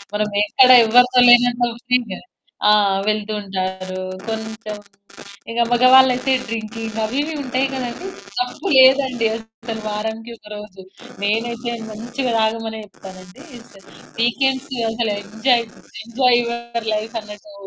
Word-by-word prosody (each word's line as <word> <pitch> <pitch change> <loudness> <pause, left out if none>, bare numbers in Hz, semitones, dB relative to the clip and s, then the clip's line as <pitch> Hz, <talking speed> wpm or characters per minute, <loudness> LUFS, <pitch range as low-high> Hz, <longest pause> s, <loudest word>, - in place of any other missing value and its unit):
మనం 210 0 0 0.2
ఎక్కడ 255 +4 +5 0.2
ఎవరితో 250 +2 +5
లేనంత 245 0 +4
ఫ్రీగా 245 -6 0 0.5
ఆ! 210 - +7 0.4
వెళ్తూ 215 0 -4
ఉంటారు. 185 -1 -4 0.2
కొంచెం 220 -1 -6 0.7
ఇక 235 - 0
మగవాళ్ళయితే 255 +1 +5 0.2
డ్రింకింగ్ 225 0 -5
అవి 230 +5 -3
ఇవి 320 - -5
ఉంటాయి 260 +1 0
కదండీ! 260 +8 -5 0.3
తప్పులేదండి 260 -2 +3
అస్సలు 225 0 -8
వారానికి 220 +2 -4
ఒక - - -19
రోజు 210 -2 -11 0.4
నేనైతే 235 +3 -1 0.2
మంచిగా 240 +4 -4
తాగమనే 220 0 -1
చెప్తానండి. 185 -2 -14 0.8
వీకెండ్స్ 260 +3 0 0.2
అసలు 225 -1 -1
ఎంజాయ్ 230 +4 +1 0.4
ఎంజాయ్ 240 +1 +2
యూర్ 235 -1 -5
లైఫ్ 220 +2 -5
అన్నట్టు. 210 -1 -13
230 Hz, 110 wpm, -19 LUFS, 215-250 Hz, 0.8 s, ఆ